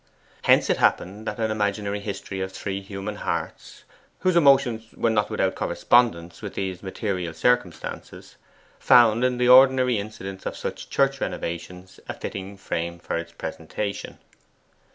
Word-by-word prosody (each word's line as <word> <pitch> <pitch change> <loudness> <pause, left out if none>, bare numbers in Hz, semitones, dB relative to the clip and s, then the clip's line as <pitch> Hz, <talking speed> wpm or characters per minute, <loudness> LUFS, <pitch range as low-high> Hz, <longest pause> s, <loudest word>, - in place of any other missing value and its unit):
Hence - - +5
it - - +1
happened 105 +5 0
that 105 +2 -4
an 110 -1 0
imaginary 105 -1 -1
history 100 -1 -5
of 95 0 -3
three 95 +1 -4
human 100 +1 -6
hearts, - - -5 0.4
whose 185 -1 +2
emotions 135 -8 +4
were 115 - +1
not 105 -2 +1
without - - 0
correspondence 90 -9 +1
with - - -7
these 95 -2 -3
material 95 -4 -3
circumstances, 110 -4 -2 0.4
found 120 -1 +5
in 125 -1 +1
the 125 0 +2
ordinary 130 -2 +6
incidents 95 -2 -7
of - - -5
such - - -6
church 135 -1 +1
renovations 90 +2 -5
a - - -3
fitting 100 +1 -7
frame 85 -2 -4
for 85 - -4
its 85 0 -5
presentation. 100 +4 -5
100 Hz, 145 wpm, -24 LUFS, 95-120 Hz, 0.4 s, ordinary